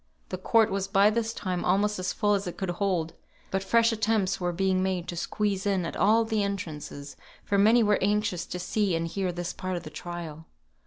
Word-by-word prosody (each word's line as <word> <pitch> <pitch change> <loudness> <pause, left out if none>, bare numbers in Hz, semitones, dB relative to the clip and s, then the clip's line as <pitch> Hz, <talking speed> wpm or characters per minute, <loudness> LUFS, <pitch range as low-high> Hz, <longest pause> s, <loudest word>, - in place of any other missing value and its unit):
The 185 - -3
court 225 +3 +3
was 195 0 -1
by 195 +2 +4
this 225 0 -1
time 185 -5 -3
almost 205 +2 +1
as 185 0 -1
full 205 0 +1
as 200 -2 -1
it 175 - -6
could 190 -3 -2
hold; 175 -3 -1 0.4
but 195 0 -1
fresh 230 +3 +3
attempts 215 -4 0
were 175 0 0
being 185 +1 +1
made 185 -2 -1
to 175 - -4
squeeze 200 +3 -1
in 190 -3 +1
at - - -5
all 225 +2 +4
the 220 -1 0
entrances, 155 -7 -5 0.3
for 200 - +1
many 225 +4 +5
were 210 -1 +3
anxious 205 -3 0
to - - -5
see 185 +1 0
and 165 0 -1
hear 185 +1 -2
this 175 0 -4
part 185 -1 -4
of - - -7
the - - -9
trial. 165 -3 -7
195 Hz, 215 wpm, -27 LUFS, 175-210 Hz, 0.4 s, many